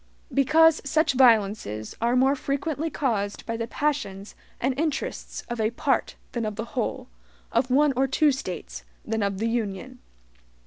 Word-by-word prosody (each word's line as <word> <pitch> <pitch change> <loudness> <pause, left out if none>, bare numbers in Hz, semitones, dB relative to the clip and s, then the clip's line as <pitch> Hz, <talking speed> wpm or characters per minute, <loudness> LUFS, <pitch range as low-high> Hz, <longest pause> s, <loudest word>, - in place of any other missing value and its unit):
Because 315 +4 +5
such 310 +2 +2
violences 210 - +2
are 235 +2 +2
more 265 +2 +4
frequently 285 +3 -2
caused 220 -9 -2
by 230 - -3
the 230 0 -3
passions 235 -9 -2 0.3
and 260 +2 +1
interests 310 -3 -3
of 240 -2 -3
a 215 - +2
part 235 - 0 0.2
than 235 - -2
of 215 -1 -3
the 225 +2 -4
whole; 245 -4 -2 0.4
of 245 +3 +1
one 285 +2 +4
or 265 +2 +2
two 295 +3 +3
States 170 - -6 0.2
than 225 0 -1
of 200 -1 0
the 225 +3 -1
Union. 230 +2 -3
240 Hz, 160 wpm, -25 LUFS, 215-275 Hz, 0.4 s, Because